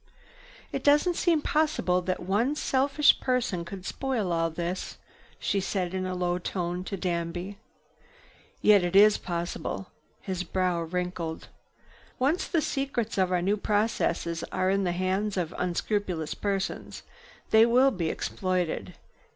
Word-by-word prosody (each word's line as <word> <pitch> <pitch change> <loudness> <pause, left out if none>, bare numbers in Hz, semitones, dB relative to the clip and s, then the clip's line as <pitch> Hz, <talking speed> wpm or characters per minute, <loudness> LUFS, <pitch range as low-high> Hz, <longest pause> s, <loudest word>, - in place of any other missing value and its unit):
"It - - -3
doesn't 295 +5 +4
seem 330 -4 +2
possible 300 - +1
that 185 +1 -2
one 210 +10 +1
selfish 280 +1 +3
person 245 -9 0
could 185 +2 -8
spoil 240 -9 -2
all 165 0 +1
this," 175 +3 -4 0.4
she 200 - 0
said 185 -2 -2
in 185 0 -2
a 185 - -3
low 180 0 0
tone 180 0 -3
to 195 - -4
Danby. 175 +2 -3 1.0
"Yet 205 -3 +6
it 175 +1 -1
is 210 +1 +7
possible." 175 +2 -4 0.3
His 185 -2 -4
brow 180 -1 0
wrinkled. 170 -1 -4 0.7
"Once 285 +8 +1
the 330 - +1
secrets 250 -6 -2
of 185 -1 +2
our 180 -1 +1
new 200 +3 +2
processes 205 -6 0
are 185 0 +1
in 195 0 +1
the 175 - +1
hands 190 +3 -1
of 175 -2 -2
unscrupulous 180 -2 -1
persons, 195 -2 -3 0.5
they 220 0 +7
will 255 +3 +5
be 170 -8 -2
exploited. 180 -2 -2
185 Hz, 140 wpm, -28 LUFS, 175-215 Hz, 1.0 s, is